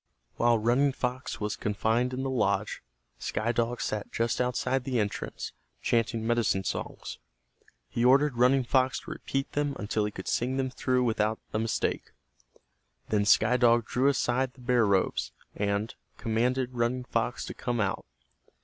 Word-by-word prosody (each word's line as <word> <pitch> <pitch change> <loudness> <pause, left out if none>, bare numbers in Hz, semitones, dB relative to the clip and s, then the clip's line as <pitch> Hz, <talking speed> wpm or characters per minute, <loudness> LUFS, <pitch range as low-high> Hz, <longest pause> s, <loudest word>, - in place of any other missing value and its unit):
While 120 0 +4
Running 125 +6 +2
Fox 125 0 -3
was 105 0 -2
confined 110 +4 0
in 130 +1 -3
the 135 - -1
lodge, 125 -4 0 0.4
Sky 115 +2 -1
Dog 120 0 -1
sat 105 -1 -3
just 115 +2 0
outside 125 +1 0
the 125 -2 0
entrance, 105 -1 -3 0.3
chanting 115 -1 0
medicine 115 -5 +1
songs. - - -5 0.7
He 115 - -2
ordered 135 +2 +5
Running 125 +2 +4
Fox 130 +1 +2
to - - -9
repeat 135 0 -3
them 145 -1 -1
until 105 0 -1
he - - -1
could 95 - -8
sing 130 +2 0
them 130 -1 -1
through 125 0 +1
without 110 -2 +1 0.2
a 110 - +1
mistake. 110 0 -1 1.0
Then 105 -1 +2
Sky 125 +4 +5
Dog 120 -1 +4
drew 130 +5 +1
aside 130 -1 +1
the 130 - -16
bear 120 -3 +3
robes, 95 -2 +1 0.2
and 100 +2 -1 0.2
commanded 125 +3 0
Running 120 +1 0
Fox - - -1
to - - -6
come 120 -1 -2
out. 100 -2 -1
120 Hz, 160 wpm, -28 LUFS, 110-130 Hz, 1.0 s, ordered